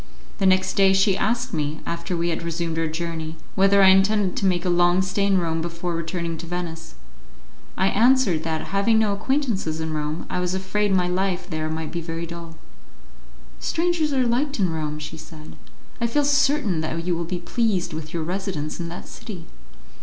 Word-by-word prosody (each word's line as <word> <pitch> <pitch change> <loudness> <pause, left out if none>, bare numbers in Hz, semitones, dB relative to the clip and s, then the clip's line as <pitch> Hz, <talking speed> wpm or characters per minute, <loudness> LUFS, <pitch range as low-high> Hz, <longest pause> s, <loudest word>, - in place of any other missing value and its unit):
The 195 - +3
next 185 0 +3
day 195 -1 +5
she 195 0 +4
asked 240 +5 0
me, 150 +1 -2
after 170 +1 -3
we 170 +1 0
had 165 - -2
resumed 165 -1 -2
our 165 - +1
journey, 160 0 -4 0.2
whether 195 +1 +5
I 190 - +8
intended 195 0 +4
to 195 - +2
make 180 -1 +1
a - - +1
long 175 +1 +4
stay 200 +2 0
in 195 -1 +3
Rome 165 -2 0
before 170 +1 -3
returning 165 0 -3
to 170 - -7
Venice. 165 -2 -5 0.8
I 190 - +2
answered 230 -7 +4
that, 160 -1 -3
having 200 +3 +3
no 215 -2 +3
acquaintances 220 - -1
in 160 0 -3
Rome, 150 +1 -3
I - - -2
was 180 +1 -1
afraid 195 +2 0
my 180 -2 +3
life 185 0 -1
there 155 -3 -3
would 160 0 -4
be 170 - -3
very 165 0 -4
dull. 170 -1 -9 1.0
"Strangers 330 -2 0
are 260 -2 +2
liked 265 +3 0
in 185 -4 +2
Rome," 150 -1 -3
she 150 +1 -7
said, 155 -1 -11 0.5
"I 235 - +2
feel 290 +5 +1
certain 285 - +2
that 165 +1 -3
you 180 -1 +1
will 170 - -2
be 180 +2 -3
pleased 195 +1 0
with 155 0 -6
your 165 -2 -2
residence 180 -3 -3
in 170 -1 -3
that 175 - -8
city." 200 -8 -8
180 Hz, 195 wpm, -23 LUFS, 165-200 Hz, 1.0 s, I